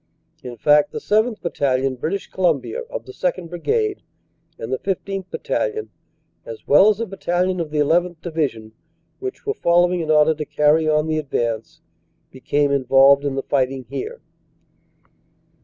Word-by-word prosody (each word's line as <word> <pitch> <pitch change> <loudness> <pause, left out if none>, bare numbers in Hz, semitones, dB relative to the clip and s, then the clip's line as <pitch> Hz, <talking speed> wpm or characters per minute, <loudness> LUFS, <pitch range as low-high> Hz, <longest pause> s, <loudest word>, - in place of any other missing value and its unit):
In 120 -1 -8
fact, 150 +4 +4
the - - -6
7th. 215 +1 0
Battalion, 135 -5 0
British 160 +10 -3
Columbia, 180 - -1
of - - -6
the - - -10
2nd. 190 - -3
Brigade, 425 - -1 0.6
and 115 +3 -5
the 130 - -1
15th. 195 0 -4
Battalion, 440 -3 -3 0.5
as - - -10
well 200 - +6
as 210 -1 0
a 230 - -1
battalion 185 -2 -1
of 165 -2 -3
the 150 0 +1
1 165 +4 +3
1th. - - -43
Divi 160 -3 0
sion, 110 -3 -12 0.5
which 390 0 -6
were 420 - 0
following 175 - +2
in 160 -2 -4
order 155 0 +5
to 155 0 -5
carry 150 +1 +2
on 150 0 +2
the 155 -1 -1
advance, 115 -6 -3 0.5
became 145 +2 0
involved 135 +1 +5
in 140 -2 -2
the 135 - -2
fighting 135 -1 -1
here. 450 - -5
160 Hz, 160 wpm, -21 LUFS, 140-195 Hz, 0.6 s, well